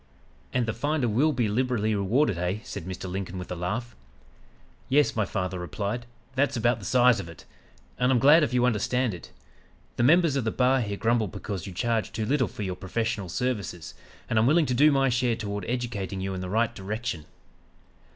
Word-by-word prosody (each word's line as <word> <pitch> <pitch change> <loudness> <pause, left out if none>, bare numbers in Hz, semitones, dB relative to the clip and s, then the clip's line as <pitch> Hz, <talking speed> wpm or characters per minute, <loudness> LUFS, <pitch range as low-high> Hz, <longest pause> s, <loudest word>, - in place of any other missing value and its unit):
"'And 125 -1 +1
"the 115 - -2
finder 145 +1 0
will 130 +9 +3
be 120 -5 0
liberally 110 -1 0
rewarded," 105 +4 +2
eh?' 90 +3 -1
said - - -7
Mr. 95 0 -6
Lincoln 95 0 -4
with 90 0 -7
a - - -2
laugh. 105 +8 -3 0.9
"'Yes,' 145 +2 +3
my 110 -2 +1
father 95 -1 -3
replied, 105 +6 -4 0.3
'that's 130 -2 +1
about 120 0 +2
the 100 - -9
size 125 +1 +4
of 85 -4 -6
it; 85 - -13 0.5
and 125 +1 +3
I'm 130 - +4
glad 145 +7 +7
if 150 - 0
you 125 -1 +2
understand 125 0 +1
it. 85 -7 -10 0.7
The - - +1
members 160 +3 +4
of 135 - 0
the 110 - 0
bar 130 +3 +2
here 100 -3 -3
grumble 115 0 +1
because 95 0 -6
you - - -6
charge 115 +3 -1
too 110 0 -2
little 130 0 +1
for 105 - -6
your 95 -2 -3
professional 110 0 -3
services, 100 - -3 0.3
and 110 - +2
I'm 110 - +3
willing 155 +3 +4
to 130 - -1
do 145 +5 +5
my 135 -1 +3
share 120 -1 +1
toward 105 -3 -4
educating 115 -6 -3
you 95 0 -3
in 95 - -4
the 90 - -5
right 115 +3 +1
direction.' 95 -5 -4
115 Hz, 200 wpm, -27 LUFS, 95-125 Hz, 0.9 s, glad